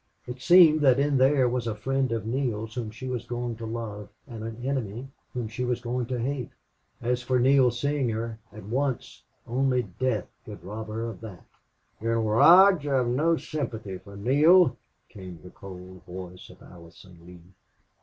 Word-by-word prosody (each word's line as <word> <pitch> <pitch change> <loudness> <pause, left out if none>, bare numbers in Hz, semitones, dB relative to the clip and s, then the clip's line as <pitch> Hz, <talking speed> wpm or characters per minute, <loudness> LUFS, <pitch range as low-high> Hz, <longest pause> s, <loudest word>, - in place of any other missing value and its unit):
It 125 +1 -8
seemed 165 -2 +6
that 130 -3 +5
in 140 -1 +2
there 130 -1 +4
was 120 -1 -2
a 110 - -2
friend 135 +3 -1
of 115 -2 -2
Neale's 115 -3 -2
whom 120 -3 -4
she 115 +4 -9
was 125 -2 -3
going 120 -1 -3
to 115 0 -6
love, 110 -3 -6 0.2
and 115 -5 -8
an 115 +1 -7
enemy 130 -2 -3 0.2
whom 120 -3 -4
she 115 +4 -5
was 125 -1 -1
going 120 0 -3
to 125 -1 -3
hate. 125 0 -3 0.5
As 125 +1 0
for 125 +1 0
Neale 130 +1 +4
seeing 135 +2 -1
her 115 0 -4
at 105 - -11
once 130 +4 -3 0.2
only 125 +1 +1
death 105 +1 -2 0.2
could - - -11
rob 110 +4 -7
her 110 +2 -4
of 110 -6 -8
that. 100 -6 -10 0.6
"General 115 -1 0
Lodge, 180 -3 +7
I 140 - +1
have 125 -2 +1
no 160 +7 +2
sympathy 110 -13 -5
for 100 +1 -13
Neale," 145 - +5 0.3
came 95 -5 -11
the 90 - -12
cold 95 -1 -11
voice 90 0 -9
of - - -16
Allison 85 +1 -15
Lee. 90 +1 -15
120 Hz, 180 wpm, -26 LUFS, 105-130 Hz, 0.6 s, Lodge